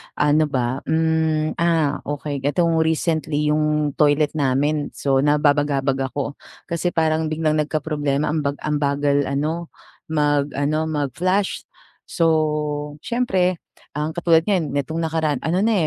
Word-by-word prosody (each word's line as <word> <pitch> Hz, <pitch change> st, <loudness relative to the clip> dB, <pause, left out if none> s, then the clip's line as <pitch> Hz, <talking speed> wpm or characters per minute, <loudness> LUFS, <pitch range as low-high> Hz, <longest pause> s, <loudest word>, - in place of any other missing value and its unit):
Ano 150 Hz, +1 st, +3 dB
ba, 130 Hz, -1 st, -1 dB
hmm, 160 Hz, -1 st, +1 dB
ah, 165 Hz, -4 st, +2 dB
okey. 145 Hz, -1 st, -3 dB
Etong 165 Hz, +1 st, +2 dB
recently, 160 Hz, -2 st, 0 dB
yung 150 Hz, -1 st, +1 dB
toilet 145 Hz, 0 st, +3 dB
namin, 145 Hz, +1 st, 0 dB
so 135 Hz, -1 st, +1 dB
nababagabag 145 Hz, -2 st, +2 dB
ako. 145 Hz, 0 st, -4 dB, 0.2 s
Kasi 170 Hz, 0 st, -2 dB
parang 160 Hz, 0 st, +1 dB
biglang 155 Hz, 0 st, 0 dB
nagkaproblema 150 Hz, -1 st, -1 dB
ang 160 Hz, -, 0 dB
bag 140 Hz, -1 st, -1 dB
ang 150 Hz, -1 st, 0 dB
bagal 140 Hz, 0 st, +1 dB
ano, 155 Hz, +5 st, -2 dB, 0.4 s
mag-ano, 145 Hz, 0 st, 0 dB
mag-flash. 160 Hz, -, -1 dB, 0.4 s
So, 150 Hz, -3 st, 0 dB
siyempre 190 Hz, -8 st, 0 dB, 0.4 s
ang 150 Hz, +1 st, -1 dB
katulad 170 Hz, -1 st, +4 dB
ngayon 175 Hz, -9 st, 0 dB
nitong 160 Hz, +4 st, -2 dB
nakaraan 155 Hz, -3 st, 0 dB
ano 175 Hz, +4 st, +1 dB
na, 225 Hz, +2 st, +2 dB
150 Hz, 125 wpm, -21 LUFS, 145-160 Hz, 0.4 s, katulad